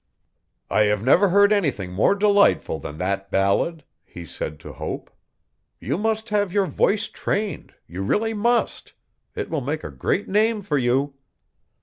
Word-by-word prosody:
'I - - +3
have 105 0 0
never 175 - +4
heard 200 +3 +5
anything 135 - -1
more 105 - +2
delightful 200 - +3
than 75 +2 -8
that 95 +2 -2
ballad,' 100 - +1 0.2
he 85 - -11
said 75 0 -6
to - - -9
Hope. - - -6 0.7
'You - - -2
must 220 +1 -1
have 205 -3 0
your 200 0 +2
voice 215 +3 +1
trained 205 -5 -3
you 90 +3 -7
really 220 - 0
must. 235 +3 0 0.4
It - - -4
will 160 -3 -1
make 150 +5 -3
a - - -6
great 205 - -1
name 215 +1 +1
for 150 -6 0
you.' 130 +3 +1
170 Hz, 155 wpm, -23 LUFS, -, 0.7 s, heard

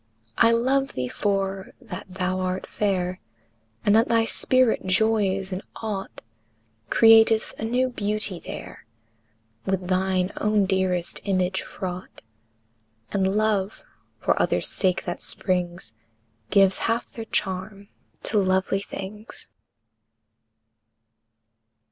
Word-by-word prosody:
III. 230 - +6
I - - +4
love 270 +4 +1
thee 125 -1 -2
for 195 - -2
that 180 +3 -8
thou 185 0 -2
art 185 0 -2
fair; 185 -3 -1 0.7
And 205 - +5
that 225 +1 +5
thy 230 -1 +3
spirit 255 0 +2
joys 195 -1 +1
in 185 +1 -3
aught 205 -3 -5 0.7
Createth 225 -1 +6
a - - -4
new 250 +3 +1
beauty 210 -5 -2
there, - - -9 0.8
With 190 -1 -2
thine 185 0 +1
own 210 -1 +2
dearest 185 -2 0
image 190 -1 +1
fraught; 185 -1 -7 0.9
And 195 0 +1
love, 215 -2 0 0.3
for - - +1
others' - - +1
sake 185 -2 +1
that 175 - -4
springs, 180 - -2 0.6
Gives 195 -1 +4
half 230 +1 -1
their 225 - -7
charm 200 -1 -3 0.4
to 215 - +2
lovely 190 0 +1
things. 205 +2 -7
195 Hz, 110 wpm, -25 LUFS, 185-215 Hz, 0.9 s, III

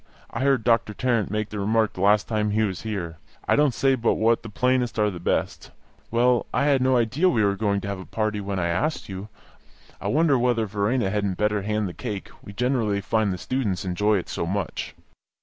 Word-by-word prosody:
I - - -4
heard 135 -3 +2
Doctor 115 -2 +2
Tarrant 120 -4 0
make 110 +1 -2
the 105 - -5
remark 110 +2 +1
the 90 - -7
last 100 +1 +4
time 105 -2 0
he 110 +1 +1
was 95 -4 -2
here. 90 -7 -4 0.3
I - - +4
don't 145 -2 +4
say 135 -1 +3
but 120 -3 +1
what 115 +1 +2
the 115 - -9
plainest 125 0 0
are 105 -1 +2
the 90 - -7
best. 85 - -2 0.4
Well, 120 +1 +2
I 140 - +1
had 140 -3 +3
no 130 0 +3
idea 130 +10 +2
we 115 -11 +2
were 100 -1 +2
going 100 -1 0
to - - -6
have 100 -1 -4
a 95 - -8
party 110 -1 -2
when 100 -1 -3
I 85 - 0
asked 120 - -1
you. 95 +2 -7 0.7
I - - -3
wonder 150 -3 +3
whether 120 -2 +1
Verena 105 +1 0
hadn't 100 -3 -1
better 105 -1 +1
hand 105 0 -1
the 90 - -6
cake; 105 -4 -6
we - - -10
generally 115 -2 0
find 105 0 0
the 90 - -3
students 105 -6 -2
enjoy 105 +4 +1
it 90 - -4
so 85 - -3
much." 95 0 -3
105 Hz, 220 wpm, -24 LUFS, 100-120 Hz, 0.7 s, last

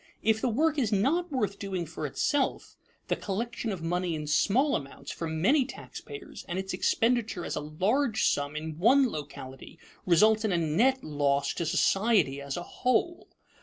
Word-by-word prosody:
If 220 0 +2
the 255 - +1
work 300 +6 +1
is 230 -6 0
not 295 - +1
worth 210 -7 -1
doing 190 -3 -3
for 155 -1 -5
itself, 275 - -1 0.3
the - - +1
collection 230 +3 -3
of 180 -4 -5
money 175 0 -1
in 150 -1 -5
small 235 - +2
amounts 140 0 -6
from 160 -1 -4
many 270 +7 +5
taxpayers 425 +10 -9
and 175 - -2
its 190 0 -3
expenditure 225 -1 +1
as - - -3
a - - -1
large 210 - 0
sum 145 +1 0
in 155 +1 -5
one 260 +7 +5
locality 135 -3 -8 0.3
results 215 +5 +5
in 215 - +1
a 175 - +2
net 220 +12 +2
loss 140 -2 0
to 170 - -3
society 195 -7 +2
as 140 +2 -4
a 175 - -4
whole. 255 - -1
195 Hz, 170 wpm, -28 LUFS, 155-245 Hz, 0.3 s, many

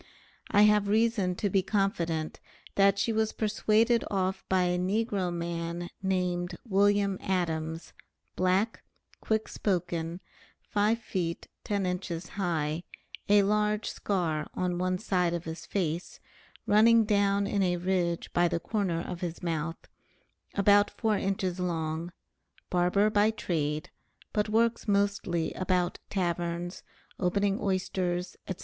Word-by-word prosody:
I 205 - +5
have 210 -1 +4
reason 210 -3 +2
to 205 - -1
be 195 0 +2
confident 175 -6 -1 0.3
that 195 0 +4
she 210 +3 +1
was 220 0 +1
persuaded 220 +2 +2
off 190 -1 -1
by 185 -1 +3
a 180 0 +1
negro 195 -1 0
man 170 0 -4
named 180 -2 -1
Wm. 200 -1 +3
Adams, 165 -3 -2 0.4
black, 185 +5 +1 0.4
quick 220 0 0
spoken, 175 -3 -2 0.4
5 210 +2 +1
feet 185 -7 -4 0.2
10 200 -3 0
inches 180 -1 -3
high, 165 -5 -1 0.5
a 205 0 +6
large 210 +1 +1
scar 165 -6 -1
on 180 -1 -1
one 185 0 0
side 180 -3 0
of 170 - -4
his 160 0 -7
face, 170 -3 -2 0.5
running 225 +2 +6
down 200 -1 +2
in 200 0 0
a 180 -2 +2
ridge 175 -1 -1
by 175 0 +4
the 170 0 -1
corner 180 -3 -1
of 170 0 -6
his 175 -1 -4
mouth, 165 -1 -3 0.7
about 205 0 +5
4 220 -2 0
inches 190 -2 -1
long, 165 -1 -2 0.6
barber 180 +4 +3
by 210 +1 +4
trade, 155 -8 -2 0.4
but 210 0 0
works 230 +1 +1
mostly 200 -4 +1
about 180 -1 0
taverns, 175 -1 -2 0.4
opening 200 +2 +1
oysters, 185 -2 -1
&c. 190 - -2
185 Hz, 130 wpm, -29 LUFS, 175-205 Hz, 0.7 s, a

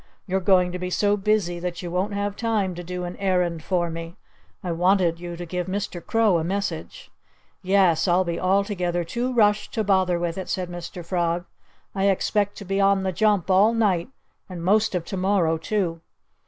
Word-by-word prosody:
"You're 190 0 0
going 180 -1 +3
to 180 - -5
be 180 0 -3
so 205 +2 +2
busy 200 -4 0
that 175 0 -4
you 175 - -5
won't 190 +4 -1
have 205 0 -2
time 215 -5 0
to 175 +1 -7
do 180 +1 -5
an 175 0 -5
errand 180 -4 0
for 175 -2 0
me. 165 +1 -7 0.5
I 180 - -2
wanted 175 0 +2
you 175 -1 -6
to 175 - -6
give 180 +1 -3
Mr. 190 -2 -4
Crow 220 -6 +2
a - - -2
message." 200 - -4 0.5
"Yes 185 -3 +3
I'll 180 +1 +3
be 170 -1 -3
altogether 185 -2 0
too 240 +9 -2
rushed 210 -4 +2
to 220 - +1
bother 190 -3 +2
with 170 +1 -2
it," 190 - -6
said 180 -2 -2
Mr. 175 0 -7
Frog. 175 -1 -1 0.5
"I 195 -1 0
expect 205 +1 0
to 200 - -8
be 195 +1 0
on 195 -1 +3
the 190 - 0
jump 200 0 +1
all 205 +5 +5
night 200 -4 +1 0.4
and 175 -2 -7
most 210 +2 +2
of 170 -2 -2
to 195 - -5
morrow, 185 -4 +1
too." 175 -4 -2
185 Hz, 195 wpm, -24 LUFS, 175-200 Hz, 0.5 s, all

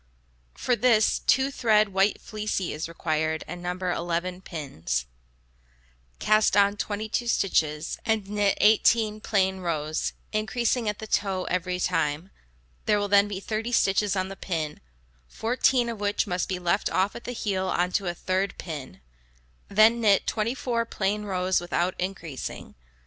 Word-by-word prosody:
For 245 - +1
this, 230 -2 +3
two 265 +1 +2
thread 215 -5 +3
white 195 +1 +2
fleecy 210 -4 -3
is 155 +2 -4
required, 160 -1 -1
and 175 - -7
No. 180 0 -2
11 180 0 -2
pins. 130 - -4 1.1
Cast 215 - +3
on 200 0 +4
22 215 +3 -3
stitches, 155 -8 0
and 220 -3 0
knit 205 -1 +1
18 215 0 +4
plain 190 -3 +1
rows, 155 -3 -2 0.2
increasing 230 +1 0
at 210 - -3
the 220 - -7
toe 195 -3 0
every 180 0 -1
time; 150 +2 -1 0.6
there 210 - +4
will 205 0 -1
then 200 0 +5
be 200 -2 -4
30 220 +3 -3
stitches 200 -2 +2
on 185 0 -1
the 195 - -7
pin, 160 -6 -3 0.5
14 240 - +1
of 230 -3 -4
which 205 0 0
must 180 -3 -2
be 185 - -1
let 180 +3 0
off 185 +4 +1
at - - -9
the - - -4
heel 195 -5 -2
on 180 0 0
to 195 0 0
a 175 - -2
third 185 +2 -1
pin; 145 - -7 0.7
then 220 +3 +5
knit 205 -3 +4
24 230 +1 -1
plain 210 -1 -2
rows 185 -2 0
without 175 +1 0
increasing. 175 -7 -5
195 Hz, 150 wpm, -26 LUFS, 180-215 Hz, 1.1 s, then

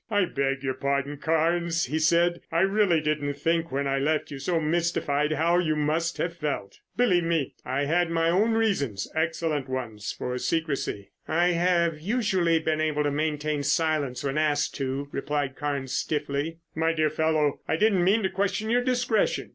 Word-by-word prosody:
"I 205 -3 +2
beg 135 -3 -2
your 130 -1 -1
pardon, 140 +2 -1
Carnes," 165 +3 +1
he 150 +5 -2
said. 170 +2 +3
"I 165 +1 +2
really 195 -4 +3
didn't 150 -2 -1
think 165 +3 0
when 140 +1 -1
I 135 0 0
left 150 +2 0
you 140 - -6
so 170 +4 0
mystified 155 -2 0
how 170 +3 +2
you 155 -3 +1
must 155 +3 0
have 170 0 -2
felt. 150 -11 -4 0.2
Believe 210 -8 +3
me, 165 -5 0
I 135 +3 -1
had 170 +3 +1
my 165 0 +1
own 210 +6 +2
reasons, 145 - 0
excellent 160 -3 -1
ones, 115 -5 -4
for 125 - -4
secrecy." 145 -12 -2 0.2
"I 175 +3 +2
have 170 -2 +1
usually 190 -5 +1
been 155 -1 0
able 150 -1 +1
to 145 - 0
maintain 150 0 -1
silence 150 -4 0
when 140 +2 -1
asked 150 -1 +1
to," 135 +1 -3
replied 145 -1 -2
Carnes 140 -3 -3
stiffly. 150 +1 -2 0.2
"My 160 +1 +1
dear 155 -2 +1
fellow, 155 -2 +1
I - - +1
didn't 195 0 +3
mean 205 +5 +3
to 190 - +1
question 200 +3 -1
your 245 +1 +3
discretion. 245 -3 0
155 Hz, 175 wpm, -26 LUFS, 145-170 Hz, 0.2 s, said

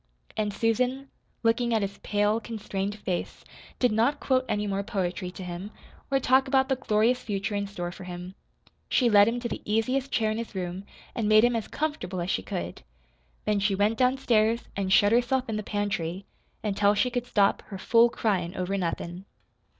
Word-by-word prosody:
And 210 -1 0
Susan, 250 +6 0 0.3
looking 235 +1 +2
at 215 - +1
his 200 0 -5
pale, 210 +1 +1
constrained 205 -3 -4
face, 185 -4 -4 0.3
did 250 -2 +2
not 235 +7 +2
quote 260 -1 +1
any 210 0 0
more 200 -1 -1
poetry 190 -3 -3
to 185 +1 -9
him, 180 +3 -6 0.4
or 270 -1 +2
talk 265 +1 +3
about 265 0 +2
the 265 - +3
glorious 240 0 +2
future 200 -1 -3
in 200 0 -1
store 175 -3 -5
for 185 +1 -10
him. 180 +1 -7 0.6
She 245 -3 +3
led 205 0 +7
him 235 +1 0
to 235 - -2
the - - -5
easiest 255 +6 0
chair 220 -2 +1
in 215 - -2
his 230 -2 -6
room 185 +1 -4 0.3
and 225 -4 -1
made 215 +1 +7
him 240 0 +3
as 225 - -2
comfortable 295 - -3
as 175 +1 -1
she - - 0
could. 90 -2 -5 0.6
Then 210 -1 +2
she 200 0 +1
went 210 +3 +1
downstairs 240 -3 +2
and 195 -1 -2
shut 205 +2 +5
herself 245 +2 +2
in 220 -2 -2
the - - -2
pantry 200 -3 -2 0.4
until 205 0 +2
she 250 +5 +1
could 245 0 -2
stop 200 -4 +3
her 195 - -7
"fool 230 +5 +4
cryin' 190 -6 -1
over 185 +2 -2
nothin'." 175 +1 -4
210 Hz, 190 wpm, -27 LUFS, 195-240 Hz, 0.6 s, led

